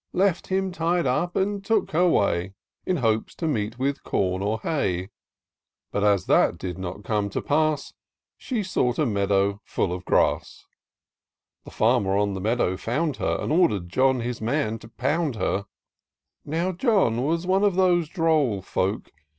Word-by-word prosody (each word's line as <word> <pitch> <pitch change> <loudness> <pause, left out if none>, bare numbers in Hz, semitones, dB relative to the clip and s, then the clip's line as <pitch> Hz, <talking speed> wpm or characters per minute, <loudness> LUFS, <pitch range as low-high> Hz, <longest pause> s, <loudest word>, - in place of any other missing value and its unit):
Left 190 -1 +1
him 190 0 0
tied 170 0 0
up, 170 +8 0
and 200 +1 0
took 225 +3 +1
her 175 +3 +3
way, 95 - +1 0.3
In 185 - +1
hopes 110 -4 0
to 165 - -3
meet 115 -5 -2
with 140 +2 -1
com 95 -1 -1
or 105 +3 -1
hay; 95 - -1 0.8
But, 100 - -1
as 100 -3 +3
that - - +3
did 90 0 -5
not 95 +2 -6
come 105 -1 -1
to - - -3
pass. 155 -1 0 0.4
She 235 -5 -3
sought 125 -10 0
a 155 - +2
meadow 100 -2 +1
fiill 90 - -1
of 90 +1 -6
grass: - - 0 1.0
The - - -9
farmer 95 0 +2
in 100 -1 +1
the 95 - -5
meadow 110 -3 0
found 140 - -1
her. - - 0
And - - -3
order'd 105 - +2
John, 130 +4 +2
his 120 -1 -4
man, 115 -2 -1
to - - -13
pound 140 +4 -1
her: 100 0 -1 0.8
Now 165 +5 -1
John 185 - +2
was 165 +4 0
one 190 +2 +2
of 200 -3 +3
those 175 -4 +3
droll 155 - +1
folk. 95 +3 -2
125 Hz, 165 wpm, -25 LUFS, 100-170 Hz, 1.0 s, her